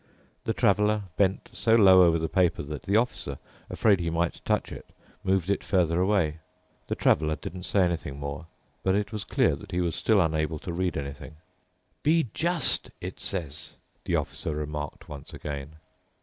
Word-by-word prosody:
The 115 - 0
Traveler 105 -1 +3
bent 95 0 +1
so 115 0 +3
low 95 -4 +8
over 85 -2 +5
the 80 0 -1
paper 90 -2 +1
that 75 0 -6
the 100 +2 +2
Officer, 110 - -1 0.3
afraid 100 -4 +3
that - - -2
he 85 - 0
might 85 +1 -1
touch - - 0
it, - - -9 0.3
moved 95 -2 +1
it 100 - 0
further 90 -2 +2
away. 90 -6 +1 0.5
The - - -1
Traveler 80 0 +2
didn't 90 +3 -7
say 100 - +3
anything 85 -6 -2
more, 70 +3 -5 0.3
but 95 0 +2
it 105 +1 -1
was 105 -2 -4
clear - - +2
that 105 +6 -12
he 90 - -1
was 85 -3 0
still 110 -3 +3
unable 80 -2 +1
to 85 +3 -6
read 90 -1 -1
anything. 70 +2 -6 0.3
" 90 - -44
'Be 155 -6 +2
just!' 170 -3 0
it - - -7
says," 80 -6 -3 0.3
the - - +1
Officer 80 - -2
remarked 75 -1 -5
once 70 -2 -9
again. 75 +1 -6
90 Hz, 180 wpm, -27 LUFS, 75-100 Hz, 0.5 s, low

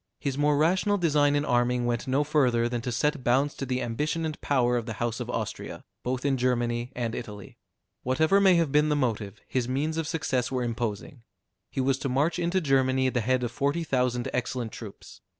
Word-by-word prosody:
His 140 -2 -2
more 145 0 +2
rational 185 +6 +2
design 145 -5 +3
in 145 +1 +1
arming 120 -1 +1
went 120 0 -1
no 135 +3 +2
further 130 -6 +2
than 120 -1 -3
to 125 +1 -3
set 150 +3 0
bounds 135 +4 +2
to 135 - -4
the 130 0 -1
ambition 150 +8 -2
and 155 -1 -5
power 125 -3 +2
of 120 -2 -2
the 110 - -3
house 120 -2 -2
of - - -5
Austria, - - -4 0.2
both 125 +2 -3
in 135 -2 +2
Germany 120 -1 0
and 120 -2 -2
Italy. 105 -5 -8 0.4
Whatever 160 +10 +3
may 190 -2 +6
have 165 -4 +2
been 150 +1 +3
the 150 - +2
motive, 110 -6 -2
his 125 -2 -1
means 150 +5 -1
of 165 -2 -1
success 130 -6 -1
were 130 -1 -1
imposing. 120 +1 -4 0.5
He 135 - -2
was 135 0 +1
to 135 - -2
march 150 +7 +1
into 175 +2 +1
Germany 130 -3 +2
at 130 - +1
the 125 - +1
head 130 +2 +1
of 120 - -2
forty 140 +6 0
thousand 125 -4 0
excellent 125 -2 -2
troops. 105 -4 -11
130 Hz, 210 wpm, -27 LUFS, 120-150 Hz, 0.5 s, may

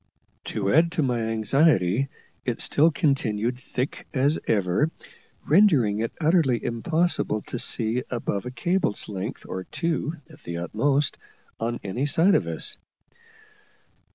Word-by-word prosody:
To 100 -2 -1
add 165 +3 +4
to 155 - +1
my 125 -3 0
anxiety, 115 - +2 0.3
it 120 -2 -2
still 155 +3 +4
continued 125 - 0
thick 130 +1 -4
as 140 +4 +3
ever, 100 - +2 0.6
rendering 145 - +4
it 115 +1 -1
utterly 155 - +2
impossible 120 -2 0
to 125 - -5
see 115 +2 0
above 120 -2 -3
a - - -5
cable's 170 - 0
length, 100 +3 -5
or 95 0 -5
two 165 -1 -2
at 155 -2 -17
the 85 -6 -5
utmost, 135 - 0 0.4
on 120 +1 -2
any 120 +9 -2
side 170 +6 +4
of - - +2
us. - - +1
125 Hz, 130 wpm, -25 LUFS, 110-155 Hz, 0.6 s, add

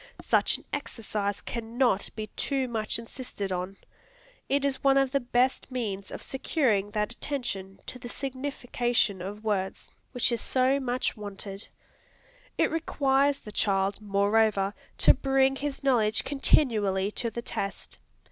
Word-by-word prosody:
Such - - +2
an - - -18
exercise 205 -3 -3
cannot 235 -2 0
be 215 - -3
too 270 -2 0
much 220 -3 -1
insisted 230 -4 -5
on. 185 +2 -3 0.7
It 280 +1 +2
is 275 -1 -1
one 275 0 +5
of 270 -1 +3
the 275 - +2
best 245 +1 +1
means 205 -6 -3
of - - -7
securing 245 - +1
that 210 +1 -1
attention 200 -9 -4
to 250 - -7
the 240 - -7
signification 245 -6 -1
of 205 +3 -6
words, 195 -3 -2 0.2
which 245 -1 +1
is 235 - 0
so 260 +2 +2
much 255 -1 0
wanted. 200 -1 -6 0.9
It - - +3
requires 280 -3 +2
the 215 - -10
child, 195 -1 +1
moreover, 200 0 +2 0.2
to - - +7
bring 270 0 +2
his 285 -1 -3
knowledge 230 -5 +3
continually 210 -9 +2
to 230 +2 -1
the 235 +1 -5
test. 200 -3 -4
235 Hz, 140 wpm, -28 LUFS, 200-265 Hz, 0.9 s, to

